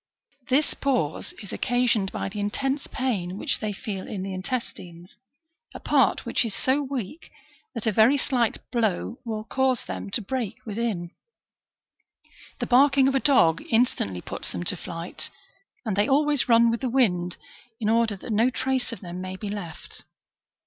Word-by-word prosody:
This 280 +4 +3
pause 165 - -1
is 200 - -8
occasioned 245 -6 +1
by - - -3
the 195 +2 -6
intense 270 +7 -1
pain 200 -9 -2
which - - 0
they 215 - -2
feel 195 -1 -5
in 190 -3 -4
the 195 0 -4
intestines, 185 -4 -5 0.6
a - - -5
part - - +2
which - - +1
is 225 -4 -4
so 265 +3 +2
weak, 270 - -5 0.5
that 230 - -3
a 220 - +3
very 220 +7 +5
slight 250 -4 +1
blow 230 -1 0
will 220 -3 -3
cause 260 +1 +1
them 95 +1 -5
to - - -1
break 240 -1 -2
within. 210 -6 -2 1.5
The - - -2
barking 270 +1 +5
of 270 - +2
a 270 - +3
dog 185 - +4
instantly 225 - +1
puts - - -6
them 85 - -4
to - - +2
flight, 170 0 -6 0.6
and 215 -4 0
they 205 +1 +2
always 290 -1 +3
run 230 0 +6
with 230 - -2
the 260 - 0
wind, 180 -9 +2 0.4
in 215 - -1
order 225 -1 +3
that 215 +4 -5
no 225 +4 +4
trace 260 0 -1
of 230 - -7
them 180 -1 -6
may 185 0 -5
be 205 +2 -5
left. 180 -7 -7
225 Hz, 170 wpm, -26 LUFS, 190-255 Hz, 1.5 s, run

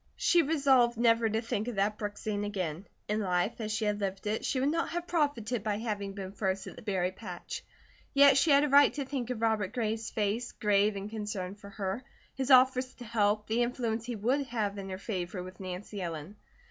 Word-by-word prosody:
She 345 0 +4
resolved 270 -6 +3
never 230 -1 +4
to 220 +1 0
think 220 -1 -2
of 245 - -3
that 205 +2 0
brook 205 -1 -4
scene 205 -1 -2
again. 190 -3 -3 0.2
In 210 +1 0
life, 185 +3 0
as 215 -1 -3
she 215 0 -1
had 210 0 0
lived 195 0 -3
it, 210 +1 -1
she 260 - 0
would 275 +3 +2
not 330 +1 0
have 345 0 -3
profited 255 - 0
by 210 -2 0
having 205 -3 -3
been 195 -1 -6
first 190 -1 -2
at - - -9
the - - -11
berry 185 -4 0
patch. 185 -3 -7 0.5
Yet 280 0 +7
she 310 - +3
had 280 0 +6
a - - +2
right 285 +1 +7
to 285 -2 -2
think 260 -3 -3
of 235 -3 -3
Robert 220 -4 +1
Gray's 225 -1 -2
face, 220 +3 -1
grave 205 0 +2
in 200 0 -4
concern 205 -4 -4
for 205 0 -12
her, 200 +3 -3 0.3
his 270 0 -3
offers 255 0 +5
to 245 - -10
help, 210 -2 +1
the 225 +2 0
influence 235 -2 -1
he 245 - -3
would 255 +7 0
have 210 -4 -2
in 195 0 -6
her 185 - -4
favour 185 -2 -4
with 185 0 -11
Nancy 190 +2 -6
Ellen. 165 +2 -5
215 Hz, 220 wpm, -30 LUFS, 200-245 Hz, 0.5 s, Yet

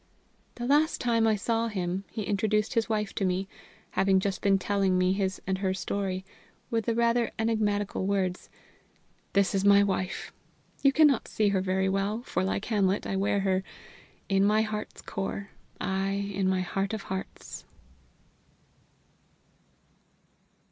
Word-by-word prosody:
The 240 - -4
last 295 +5 +3
time 230 -2 +2
I 220 - +4
saw 230 +3 0
him, 190 -2 -3
he 220 - -4
introduced 210 +3 0
his 230 -2 +1
wife 210 -2 -1
to - - -2
me 185 +1 0 0.4
having 195 0 +3
just 195 0 -2
been 195 -1 +4
telling 195 -1 +1
me 185 0 +3
his 190 -1 -1
and 190 0 -1
her 190 -1 0
story 190 0 -3 0.5
with 225 -1 0
the 230 - 0
rather 235 0 +2
enigmatical 210 -3 0
words: 190 -2 -1 0.8
"This 200 0 +3
is 195 -1 +1
my 200 0 +6
wife. 190 -2 -2 0.5
You 275 - +5
cannot 295 -4 +4
see 210 -1 +1
her 195 -2 +1
very 190 0 0
well, 200 +4 -1
for, 185 -7 -1
like 195 +2 -1
Hamlet, 200 -3 +1
I 195 - -2
wear 200 +1 +1
her 190 -1 +1 0.6
'in 195 0 +3
my 215 +2 +4
heart's 215 -1 -5
core, 195 +1 -4 0.3
aye, 195 +1 -1
in 190 -1 +1
my 185 -1 +1
heart 195 +3 -2
of 215 - -6
hearts!'" 190 0 -6
200 Hz, 150 wpm, -28 LUFS, 190-215 Hz, 0.8 s, my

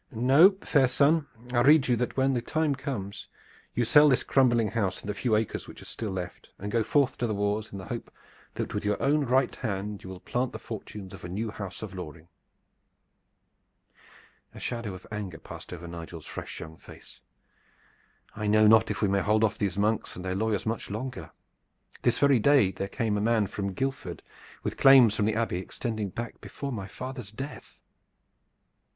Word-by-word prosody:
No, 135 - +6
fair 135 -4 +4
son, 145 +4 +3 0.3
I 120 - +4
rede 145 +2 +6
you 125 - +3
that 125 +3 -2
when 135 0 +3
the 120 - 0
time 155 +4 0
comes 110 -8 -5 0.5
you 120 - +2
sell 150 +5 +7
this 130 - +3
crumbling 120 -5 +3
house 100 -5 -1
and - - -10
the 105 - -1
few 110 +2 +1
acres 110 0 -1
which - - -11
are - - -12
still 110 - -5
left, 90 -2 -6
and 105 +2 -5
so 115 - +2
go - - +2
forth 135 +2 +1
to 120 - +1
the 110 - -1
wars 105 +1 -1
in 100 - -6
the 95 - -7
hope - - -5 0.5
that - - -3
with - - -2
your 105 0 0
own 145 +1 +2
right 130 +1 +2
hand 105 -2 -4
you 95 - -8
will 95 -1 -8
plant 125 +5 -2
the - - -4
fortunes 105 -3 -8
of - - -11
a 90 - -6
new 105 +4 -3
house 100 -1 -7
of 105 -3 -6
Loring." 85 -2 -8 2.3
A - - -8
shadow 115 -5 -4
of 90 - -12
anger 100 -6 -5
passed - - -11
over 85 -1 -7
Nigel's 85 -1 -8
fresh - - -7
young 80 0 -9
face. - - -14 1.2
"I 105 -1 -3
know 110 +1 +5
not 110 +1 +6
if - - -2
we - - +4
may 100 0 +2
hold 105 +2 +2
off 110 -1 +1
these 100 -1 -1
monks 105 +2 0
and 90 - -8
their 95 - -1
lawyers 105 0 0
much 115 0 -3
longer. 120 +6 -5 0.7
This 120 -1 +2
very 140 -3 +4
day 120 -5 +5
there 95 +1 -4
came 110 -4 -1
a - - -1
man 110 -1 +3
from 100 0 -4
Guildford 135 +7 -3 0.4
with - - -3
claims 130 -5 +8
from 105 - +1
the 110 0 +1
Abbey 110 -6 0
extending 110 +2 -4
back 120 +5 -6
before 140 -1 -6
my 100 -6 -4
father's 125 0 -7
death." 135 +6 -8
110 Hz, 200 wpm, -28 LUFS, 100-130 Hz, 2.3 s, claims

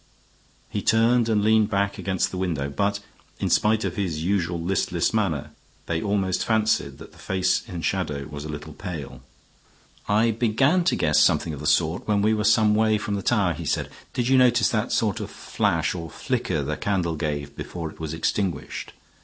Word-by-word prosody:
He - - -3
turned 115 +1 +3
and 105 -2 +2
leaned 110 0 +4
back 100 -1 0
against 95 -2 -1
the 95 - -5
window, 80 -7 -2
but, 100 +8 0 0.4
in - - -1
spite 110 +1 +3
of 90 -2 -3
his 85 -6 -2
usual 90 -2 0
listless 85 0 0
manner, 95 -11 -1 0.3
they 85 -1 -1
almost 95 -3 0
fancied 110 -1 +1
that - - -12
the - - -19
face 95 0 +1
in 85 -3 -5
shadow 75 -8 -1
was 75 -1 -7
a 75 - -7
little 75 +1 -7
pale. 85 -8 -7 0.9
"I 110 +3 +3
began 125 - +2
to - - +3
guess 75 -1 +2
something 80 - +3
of 75 - -7
the 75 - -3
sort 80 +2 +1
when 105 -1 +2
we 110 +1 +3
were 105 -1 0
some 110 0 +4
way 110 0 +3
from 105 0 -4
the 100 - -1
tower," 100 -4 +2
he - - -7
said. - - -1 0.2
"Did 120 -1 0
you 130 0 +5
notice 120 -4 +4
that 110 +1 -1
sort 105 -5 +1
of - - -5
flash - - -1
or 85 -2 -6
flicker - - -2
the - - -3
candle 90 -5 -1
gave 75 -2 -3
before 85 -3 -6
it - - -18
was 80 -2 -4
extinguished? 85 +3 -2
95 Hz, 195 wpm, -24 LUFS, 80-110 Hz, 0.9 s, you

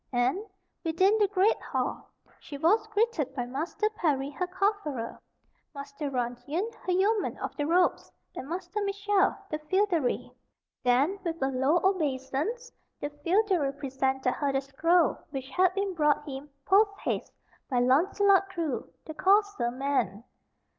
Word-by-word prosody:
And, 255 +10 +1 0.4
within 370 +6 +3
the 415 - +4
great 405 +2 +2
hall, - - -3 0.3
she 285 - -8
was 415 +9 +3
greeted 430 - 0
by 245 -3 -2
Master 305 - -2
Parry, 285 -9 0
her 360 +5 -3
cofferer, 370 - -2 0.6
Master 280 +1 -5
Runyon, 270 - -2 0.2
her - - +2
yeoman 400 +3 +1
of - - -5
the 290 -1 -2
robes, 355 +2 +2 0.2
and 270 - -7
Master 375 +4 -3
Mitchell, 400 0 +1 0.2
the 305 - -2
feodary. 340 -3 0 0.5
Then, 270 +11 +2
with 335 -2 -3
a 270 - +1
low 270 +6 +2
obeisance, 320 - -1 0.3
the 290 - -4
feodary 360 -6 +2
presented 265 -2 -1
her 285 +1 -1
the 270 0 0
scroll 330 +5 +2
which 270 -2 -6
had 370 0 +3
been 395 -1 -1
brought 300 -2 +1
him, 275 +1 -7 0.2
post 405 +1 +4
haste, - - -2 0.4
by 255 - 0
Launcelot 380 +10 +3
Crue, 335 -8 -3 0.2
the 315 - -7
courser 400 - +2
man. 245 -6 -1
320 Hz, 140 wpm, -28 LUFS, 270-390 Hz, 0.6 s, the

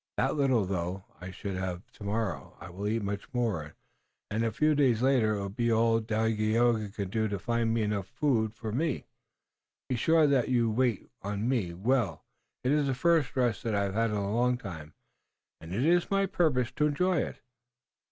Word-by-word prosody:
That - - +2
little, 130 -7 +2
though, 90 0 -3 0.2
I 90 - -6
should 95 +1 -5
have. 90 -1 -3
Tomorrow 105 -1 -4
I 85 - -9
will 100 +4 -4
eat 110 +1 0
much 100 0 -4
more, 100 -11 -1 0.6
and 110 +2 0
a 115 - +1
few 155 +8 +2
days 130 -5 +3
later 125 -5 +3
it - - -3
will 100 0 -3
be 115 +4 0
all 115 0 +3
Dagaeoga 110 0 +1
can 100 -2 -5
do 110 0 +1
to 100 -1 -2
find 115 +2 0
enough 105 -3 -1
food 115 -4 +1
for 110 -1 -5
me. 145 +3 -1 0.8
Be 130 - +1
sure 160 +6 +4
that 135 -4 +2
you 120 -3 +2
wait 120 -2 0
on 105 +2 -2
me 105 -10 0
well. 115 +4 0 0.4
It 130 - +1
is 150 -1 +2
the 135 - 0
first 160 -1 +2
rest 125 -4 +1
that 115 -2 -1
I 100 - +2
have 100 -1 -2
had 115 +2 +1
in 105 - -2
a 100 0 -1
long 125 +2 +2
time, 80 -9 -9 0.6
and 80 +1 -10
it 115 +9 0
is 175 +1 +3
my 195 0 +2
purpose 135 -10 +1
to 150 - +3
enjoy 180 +5 +1
it. - - -3
115 Hz, 195 wpm, -29 LUFS, 100-130 Hz, 0.8 s, sure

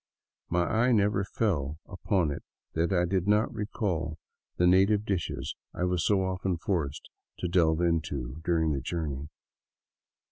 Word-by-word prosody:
My 90 +1 +2
eye 120 +7 +2
never 100 -2 +3
fell 80 - -1
upon 90 -4 0
it - - -5 0.3
that 85 +3 +1
I 90 -2 +3
did 95 +1 0
not 105 +2 +3
recall 100 -8 -2 0.4
the 90 - +3
native 100 +4 +4
dishes 80 -8 -2 0.2
I - - -2
was 90 -2 +1
so 100 -2 +3
often 95 -1 -1
forced 80 -5 -2 0.3
to 90 - -2
delve 85 -2 +3
into 80 -5 -1
during 80 -2 +2
the 70 -2 -1
journey. 75 -1 -3
90 Hz, 145 wpm, -29 LUFS, 80-100 Hz, 0.4 s, native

